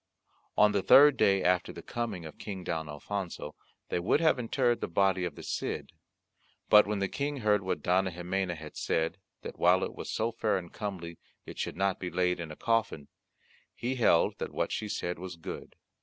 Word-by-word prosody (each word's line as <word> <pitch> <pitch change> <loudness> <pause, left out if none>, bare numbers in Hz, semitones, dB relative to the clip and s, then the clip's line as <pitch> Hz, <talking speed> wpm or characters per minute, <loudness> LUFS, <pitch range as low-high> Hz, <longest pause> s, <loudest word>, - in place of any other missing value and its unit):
On 105 0 +6
the 100 -1 +1
third 145 +7 +8
day 95 -4 +3
after 90 -1 +2
the - - -10
coming 115 -8 -4
of 80 - -10
King 95 -3 -6
Don 80 -3 -3
Alfonso, 85 0 -5 0.4
they - - 0
would 90 +11 +2
have 160 -5 +3
interred 120 0 +1
the - - -1
body 95 +1 +2
of 85 -5 -5
the - - -10
Cid, - - -3 0.8
but 105 -1 +7
when 105 0 -1
the 100 0 0
King 140 +4 -3
heard 105 -1 +3
what 95 - -3
Dona 95 +2 +2
Ximena 90 +1 -2
had 75 -1 -10
said, 80 +4 -1 0.2
that - - -8
while 90 +2 +4
it - - -3
was - - -7
so 115 +1 0
fair 105 -3 0
and 85 -2 -8
comely 90 -6 -6 0.3
it - - -9
should - - -3
not 95 0 +1
be 90 - -4
laid 90 +1 0
in 85 -2 -5
a 75 - -8
coffin, 115 -10 -1 0.7
he 125 +2 -2
held 115 -9 +3
that - - -4
what - - -1
she 105 - -3
said 90 -3 -3
was 90 -1 -6
good. 80 - -8
95 Hz, 200 wpm, -30 LUFS, 85-105 Hz, 0.8 s, third